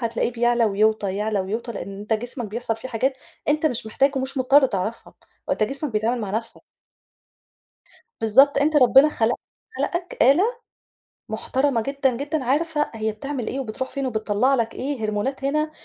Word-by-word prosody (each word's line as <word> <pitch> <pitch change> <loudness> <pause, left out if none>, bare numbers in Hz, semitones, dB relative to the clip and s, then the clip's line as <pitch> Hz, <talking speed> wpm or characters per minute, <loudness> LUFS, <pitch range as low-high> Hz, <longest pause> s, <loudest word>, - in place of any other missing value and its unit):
هتلاقيه 235 0 -1
بيعلى 240 0 +2
ويوطى، 210 -1 +1
يعلى 210 -1 0
ويوطى 220 +5 -4
لأن 195 -3 -7
أنت 210 +2 -3
جسمك، 240 +1 -3
بيحصل 225 +1 -3
فيه 240 +3 -8
حاجات 260 +3 0 0.3
أنت 305 +2 +2
مش 235 -5 -2
محتاج 275 +5 +1
ومش 265 +1 -2
مُضطر 270 +2 +5
تعرفها 215 +1 -4 0.3
هو - - +2
أنت - - -1
جسمك 275 +6 -2
بيتعامل 225 +3 0
مع 205 -3 -4
نَفْسُه. 225 +2 -1 1.6
بالضبط، 270 +6 +5
أنت 295 +2 +2
ربنا 270 +2 +7
خلق 230 -5 +1 0.4
خلقَك 350 +1 -3
آلة 275 +9 +5 0.9
مُحترمة 255 +3 0
جدًا، 270 0 0
جدًا 290 0 -2
عارفة 295 +3 0
هي 220 0 -2
بتعمل 255 +2 -5
إيه، 270 - -3
وبتروح 260 +2 -4
فين، 275 -1 -3
وبتطَلّع 220 +2 +1
لَك 230 -3 -1
إيه 265 -4 -3
هرمونات 235 +6 -2
هنا 305 +2 0
245 Hz, 165 wpm, -23 LUFS, 220-275 Hz, 1.6 s, ربنا